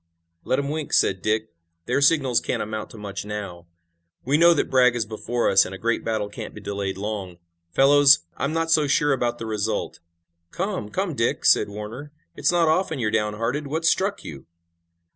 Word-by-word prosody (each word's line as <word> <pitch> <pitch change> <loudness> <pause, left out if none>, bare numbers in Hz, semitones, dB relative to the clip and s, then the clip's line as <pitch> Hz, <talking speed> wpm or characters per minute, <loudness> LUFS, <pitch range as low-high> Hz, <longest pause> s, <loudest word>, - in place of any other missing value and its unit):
"Let 130 - 0
'em 140 0 -2
wink," 155 0 -4
said 95 -1 +2
Dick. 110 0 -1 0.4
"Their 125 +3 0
signals 140 -4 +3
can't - - -2
amount 110 0 -5
to 115 - -13
much 100 -2 -6
now. 100 -5 -7 0.6
We 135 +3 +1
know 170 +2 +6
that - - -1
Bragg 125 -2 +4
is 115 -3 -1
before 115 +2 -2
us, 95 - +5
and 95 - -7
a - - -8
great 115 +3 -1
battle 110 -2 -2
can't 105 - -8
be - - -8
delayed 100 -2 -4
long. 100 -3 -5 0.3
Fellows, 140 0 +5
I'm 140 - -2
not 165 0 -1
so 155 -2 +3
sure 145 +1 +2
about 120 -2 -1
the 115 - -6
result." 110 0 -3 0.5
"Come! 185 - -4
Come, 190 - -2
Dick!" 115 -3 -1
said - - +4
Warner. 110 +8 -8 0.2
"It's - - +1
not 170 -2 +2
often 160 0 +1
you're 110 -4 -1
downhearted. 115 +7 -1
What's 160 +3 +1
struck 195 +2 -1
you?" 70 -2 -10
120 Hz, 190 wpm, -23 LUFS, 105-145 Hz, 0.6 s, know